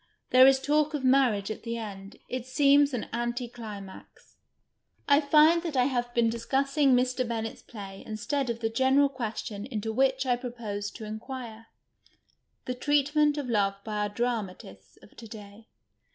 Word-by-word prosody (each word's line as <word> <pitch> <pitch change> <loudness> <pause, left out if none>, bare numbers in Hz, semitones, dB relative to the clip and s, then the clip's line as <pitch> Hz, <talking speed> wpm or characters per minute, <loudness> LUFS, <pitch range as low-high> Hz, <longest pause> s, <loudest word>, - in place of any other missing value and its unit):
There 255 +1 +8
is 270 0 +5
talk 300 +2 +1
of 280 - -4
marriage 255 -6 +3
at 215 - -6
the 230 0 -4
end. 200 -3 -8
It 255 0 -5
seems 280 +1 +4
an 245 -4 -3
anti 240 +1 -2
climax. 210 -5 -11 0.7
I 285 +1 +5
find 310 +3 +5
that 325 -5 -4
I 250 - +5
have 245 -2 -1
been 235 -1 +3
discussing 270 +4 +1
Mr. 250 0 0
Bennett's 225 -1 -4
play 195 -3 -10
instead 225 +5 -3
of 235 0 -3
the 225 - 0
general 265 +4 +3
question 220 -4 -5
into 220 -3 -4
which 265 +2 +1
I 245 -1 +2
proposed 220 -5 -6
to 220 - -8
inquire 225 +1 -8 0.5
— - - -44
the 250 - -2
treatment 290 +3 +2
of 285 -3 -3
love 200 -4 +1
by 215 -1 -4
our 210 0 0
dramatists 200 - -5
of - - -18
to 230 - -10
day. 210 0 -12
240 Hz, 165 wpm, -28 LUFS, 215-270 Hz, 0.7 s, There